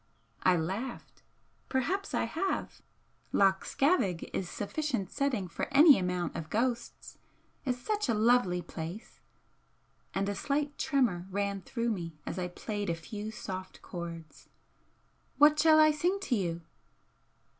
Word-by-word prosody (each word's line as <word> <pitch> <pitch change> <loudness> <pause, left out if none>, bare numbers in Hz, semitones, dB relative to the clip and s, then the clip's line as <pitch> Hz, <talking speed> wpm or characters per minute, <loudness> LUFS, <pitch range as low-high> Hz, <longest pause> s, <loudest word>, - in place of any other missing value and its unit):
I 185 - +4
laughed. 195 +10 -4 0.5
"Perhaps 360 +10 -1
I - - +1
have! 390 - -2 0.5
Loch 195 -1 +3
Scavaig 270 - +1
is 180 - -2
sufficient 245 -1 -2
setting 265 -9 0
for 170 - -4
any 285 - +8
amount 180 -2 -2
of 155 - -5
ghosts. 235 +1 -2 0.5
It's 250 -2 0
such 420 - -2
a 230 - +3
lonely 210 -5 +3
place," 170 +6 -7 1.0
and 195 +1 0
a 205 - 0
slight 285 +6 -1
tremor 230 - +1
ran 200 0 -1
through 235 +5 -2
me 165 -6 -5
as 185 - -4
I 180 - -1
played 205 +2 -4
a 170 - +1
few 210 +5 -6
soft 190 -3 -7
chords 170 -3 -8 0.9
"What 295 +2 +6
shall 310 0 +6
I 310 0 +7
sing 345 +6 +1
to 275 -11 0
you?" 170 -5 -2
210 Hz, 135 wpm, -31 LUFS, 180-280 Hz, 1.0 s, any